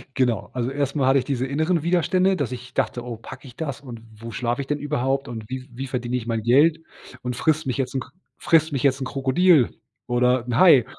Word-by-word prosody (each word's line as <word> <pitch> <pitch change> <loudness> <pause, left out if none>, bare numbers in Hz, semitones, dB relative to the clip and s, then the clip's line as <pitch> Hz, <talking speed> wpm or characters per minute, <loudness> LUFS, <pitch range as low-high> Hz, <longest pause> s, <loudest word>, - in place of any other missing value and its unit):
Genau, 125 -6 0
also, 125 0 -1
erst 140 0 -2
mal 135 -3 +2
hatte 135 - +5
ich 125 - -4
diese 130 -1 -1
inneren 160 +5 +1
Widerstände, 180 +3 +2
dass 145 -7 -2
ich 125 0 -8
dachte: 120 - -1
„Oh, 120 -2 -6
packe 135 +4 -11
ich 125 - -13
das 145 -5 -5
und 120 -5 -9
wo 115 +2 -9
schlafe 120 +4 -1
ich 135 - -7
denn 150 - 0
überhaupt 135 -2 -1
und 115 -2 -6
wie 130 0 -6
wie 135 +3 -5
verdiene 125 -1 -3
ich 120 -2 -3
mein 115 -2 -1
Geld 145 +8 +4 0.4
und 125 -1 -3
frisst 155 +3 +1
mich 130 -1 -2
jetzt 135 -1 -2
'n 130 - +1
Kr 125 - -11 0.3
frisst 160 -1 +3
mich 135 -4 -2
jetzt 135 -1 +2
'n - - -1
Krokodil 135 +2 +3 0.4
oder 125 0 +2
'n 120 -1 -2
Hai.“ 140 -8 +7
130 Hz, 235 wpm, -23 LUFS, 125-145 Hz, 0.4 s, Hai